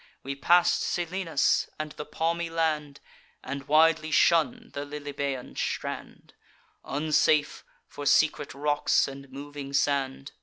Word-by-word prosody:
We 140 - -3
pass'd 175 +5 +3
Selinus, 175 -3 0
and 155 0 -4
the 150 - -8
palmy 165 +2 -1
land, 155 -3 -1 0.4
And 140 +1 -6
widely 155 +1 +4
shun 225 +10 +2
the 140 - -4
Lilybaean 140 -2 -5
strand, - - -5 0.5
Unsafe, 150 0 +1 0.2
for 145 - -6
secret 150 -2 +2
rocks 145 +1 +2
and 140 0 -9
moving 140 +1 -8
sand. 140 -1 0
150 Hz, 115 wpm, -27 LUFS, 140-160 Hz, 0.5 s, widely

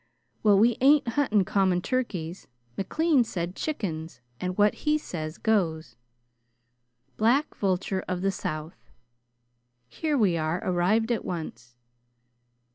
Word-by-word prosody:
"Well, 205 -2 +5
we 230 +3 +4
ain't 275 -1 +5
hunting 225 -6 +2
common 190 -2 +2
turkeys. 185 -7 -3 0.3
McLean 305 - +2
said 180 -4 -4
chickens, 170 - -4 0.2
and 180 0 -3
what 210 0 +4
he 300 0 +4
says 160 - -6
goes." 165 - 0 1.2
"'Black 250 +7 +2
vulture 190 -1 -1
of 180 0 -3
the 195 - +2
South.'" 155 -2 -6 1.0
"Here 300 - -1
we 195 -8 +3
are 160 +3 -1
arrived 195 +6 +1
at 230 - 0
once." 120 -8 -6
195 Hz, 120 wpm, -27 LUFS, 170-230 Hz, 1.2 s, Well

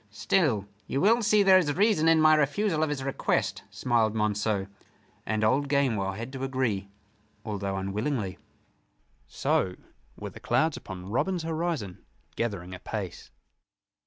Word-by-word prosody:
"Still 105 - +1 0.2
you 135 - -1
will 225 +7 +4
see 215 -2 +4
there 190 -1 +7
is 155 -5 0
reason 200 -6 +3
in 165 -1 +5
my 155 0 +6
refusal 155 +4 +1
of 155 - +1
his 140 -3 -3
request," 135 0 -1
smiled 115 -3 +1
Monceux. 105 -2 0 0.6
And 110 0 0
old 135 +6 +2
Gamewell 115 -9 +1
had 115 +6 -7
to 135 0 -5
agree, 125 -7 -1 0.6
although 100 -3 -3
unwillingly. 100 +1 -2 0.9
So 90 +5 0 0.4
were - - -6
the - - -12
clouds 160 -1 +1
upon 95 0 -8
Robin's 180 - 0
horizon 160 - -3 0.3
gathering 100 -6 -3
apace. 95 0 -6
125 Hz, 135 wpm, -27 LUFS, 100-155 Hz, 0.9 s, there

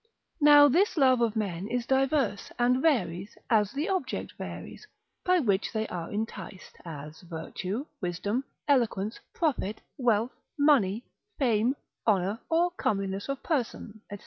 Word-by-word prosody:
Now 290 0 +9
this 350 +7 +2
love 260 -4 +5
of 230 -2 +1
men 195 -3 -2
is 240 +1 -2
diverse, 265 -5 +1
and 250 +1 +3
varies, 200 - 0
as 210 -3 +4
the 295 +4 -2
object 380 -2 -2
varies, 430 - -8 0.4
by 365 -1 +4
which 205 - +1
they 220 -1 -1
are 170 -2 -5
enticed, 210 -2 -6
as 155 -1 -8
virtue, 180 - -5 0.2
wisdom, 200 +7 -1 0.2
eloquence, 225 -7 +1
profit, 260 - -1 0.2
wealth, 235 -1 +2 0.3
money, 250 -8 +3 0.3
fame, 240 -1 +2 0.3
honour, 200 +1 +2
or 340 +2 +3
comeliness 195 - -2
of 275 -1 -3
person, 235 -7 -2
&c. 205 - -5
225 Hz, 135 wpm, -28 LUFS, 195-275 Hz, 0.4 s, Now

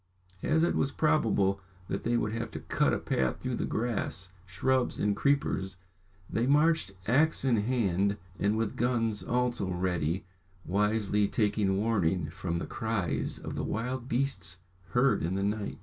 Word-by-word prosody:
As 160 +1 +2
it 170 - +2
was 135 - +1
probable 105 -12 +2 0.3
that 100 - -3
they 120 +1 +2
would 105 -2 0
have 115 +1 -3
to - - -4
cut - - +1
a - - +1
path 65 -1 -1
through - - -2
the - - -1
grass, 110 -5 -2 0.2
shrubs, 125 +8 +1
and 105 -1 +1
creepers, 105 -7 0 0.5
they 115 +2 0
marched 150 -6 +3
axe 145 +5 +2
in 125 -4 +3
hand, 100 -3 +1 0.2
and 105 +2 +2
with 115 -1 -1
guns 115 -4 0
also 120 -1 0
ready, 90 -2 -1 0.4
wisely 105 +1 +2
taking 105 -2 +1
warning 95 -7 +1
from 85 0 -3
the - - -3
cries 110 -6 -2
of - - -6
the - - -3
wild 125 +3 -3
beasts 120 -8 -1 0.3
heard 130 +5 +3
in 85 +3 -1
the 100 - 0
night. 105 0 -2
105 Hz, 160 wpm, -30 LUFS, 95-125 Hz, 0.5 s, marched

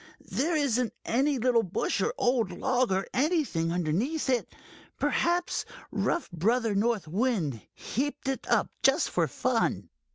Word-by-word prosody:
There 320 +5 +1
isn't 250 -6 +1
any 275 +4 +2
little 240 -1 +3
bush 185 -4 -1
or - - +1
old 245 -5 +2
log 250 +5 0
or 190 +1 +1
anything 270 - +1
underneath 195 - 0
it. 245 -2 0 0.5
Perhaps 350 +1 +1 0.3
rough 345 - 0
Brother 225 +6 +1
North 205 -4 +1
Wind 175 - 0
heaped 285 +3 -3
it 270 -1 -2
up, - - +2
just - - +3
for - - +2
fun." - - -1
245 Hz, 135 wpm, -28 LUFS, 195-270 Hz, 0.5 s, little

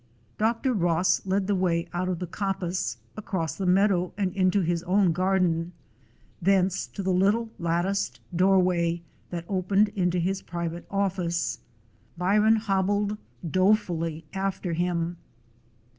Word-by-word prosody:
Dr. 230 +4 +1
Ross 175 -3 +2
led 190 +1 +1
the 205 - +1
way 175 -3 +1
out 180 +1 -1
of 180 - -1
the 180 - -4
coppice, 180 - -2 0.2
across 185 -7 -3
the 190 - -2
meadow, 185 -1 +3
and 195 -3 0
into 190 +1 +3
his 170 -1 0
own 190 0 +3
garden; 180 -1 +1 0.7
thence 190 0 +2
to 200 - -6
the 190 0 +1
little 210 +5 +2
latticed 175 +4 -1 0.2
doorway 180 -2 +2 0.3
that 170 -1 -5
opened 195 +2 +2
into 180 -4 0
his 190 +3 0
private 170 0 -5
office. 185 -4 -1 0.6
Byron 210 +5 +4
hobbled 205 0 0 0.3
dolefully 175 -4 +1
after 190 -2 -2
him. 175 0 -1
185 Hz, 130 wpm, -26 LUFS, 175-195 Hz, 0.7 s, Byron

